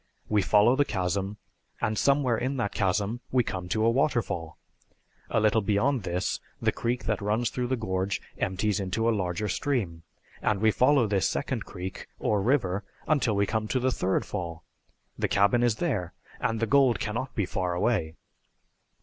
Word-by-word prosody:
We 105 -1 +3
follow 105 +6 +4
the 145 - +4
chasm, 95 -2 -2 0.4
and 110 -2 0
somewhere 140 -1 +3
in 130 +4 -2
that 110 -5 -1
chasm 100 +4 0
we 125 -1 +3
come 90 -4 -5
to 110 +2 +1
a - - +5
waterfall. 115 - 0 0.7
A - - +2
little 110 +1 +3
beyond 110 +6 +1
this 90 -1 -2 0.2
the - - +2
creek 120 +2 -2
that 105 -2 -1
runs 110 +3 0
through 125 -1 -2
the 130 - +1
gorge 95 -3 -1 0.2
empties 105 +2 0
into 100 +4 -1
a 115 - +4
larger 95 +1 -1
stream, 100 -7 -1 0.4
and 105 -2 +1
we 110 +1 +4
follow 130 +2 +4
this 100 -3 +1
second - - -2
creek 95 +1 -7
or 105 -2 +1
river 105 -5 +1 0.2
until 135 -8 +2
we 100 0 +3
come 110 +1 -1
to 130 - 0
the 130 +1 +1
third 95 -5 0
fall. 85 -2 -5 0.6
The - - +1
cabin 100 +4 +3
is 120 -3 +3
there, 110 - -2 0.3
and 115 -1 -1
the 115 - +1
gold 130 0 +4
can 105 - -2
not 125 +2 -4
be 105 - +1
far 90 -1 -2
away." 90 -5 0
105 Hz, 180 wpm, -27 LUFS, 95-120 Hz, 0.7 s, a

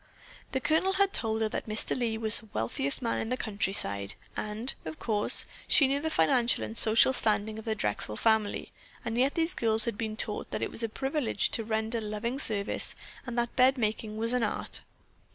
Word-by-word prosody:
The 265 - -1
Colonel 320 +7 +1
had 395 0 +2
told 220 -1 0
her 215 - 0
that - - -5
Mr. 215 +1 -2
Lee 230 -3 -1
was 220 0 +3
the 220 - -17
wealthiest 125 - +1
man 230 - -1
in 225 - -3
the 255 - -1
countryside, 190 - 0 0.2
and, 215 +4 -2
of 155 0 -7
course, 210 -2 +1 0.2
she 275 - +5
knew 275 +1 0
the 320 +2 -2
financial 235 - +2
and 220 - -6
social 225 +4 +6
standing 215 -2 0
of 220 - -11
the 220 -1 -1
Drexel 105 - -2
family, 220 -2 +1 0.3
and 225 -1 -2
yet 265 +4 +1
these 330 +1 0
girls 225 -5 +1
had 230 -4 -4
been 220 -1 -3
taught 210 -2 -2
that - - -3
it - - -3
was - - -3
a 230 - -1
privilege 270 -1 -1
to 225 - 0
render 220 +1 -2
loving 215 +5 -3
service 205 -7 +3 0.3
and 245 -1 -5
that 235 0 -1
bed 260 +1 +4
making 215 -1 -2
was 230 +2 0
an 250 - +1
art. 210 - -2
225 Hz, 205 wpm, -29 LUFS, 215-250 Hz, 0.3 s, social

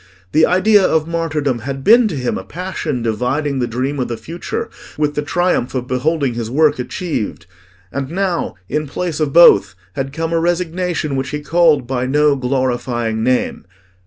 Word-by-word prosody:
The 155 +1 +4
idea 200 +3 +4
of 160 -3 +2
martyrdom 155 -6 -1
had 135 +3 -5
been 230 - +6
to 195 - -4
him 125 -3 -2
a - - -5
passion 175 -8 -4
dividing 130 +5 -1
the 120 - 0
dream 130 +5 -2
of 125 - -1
the 115 - -4
future 165 +10 -5 0.3
with 150 -1 0
the 150 - -1
triumph 165 -4 0
of 125 -1 -2
beholding 135 +1 0
his 115 -1 -4
work 145 +2 +2
achieved. 125 - -4 0.5
And 135 0 -3
now, 185 -1 -1
in 150 0 -2
place 165 +2 -3
of 150 -2 0
both, 100 - +6 0.2
had 135 +4 -3
come 165 +3 -3
a 165 - +2
resignation 175 -3 -1
which 135 +1 -2
he 150 - -3
called 160 -4 +3
by 130 0 -2
no 150 +1 +3
glorifying 120 -3 -1
name. 125 -6 0
145 Hz, 175 wpm, -18 LUFS, 125-165 Hz, 0.5 s, been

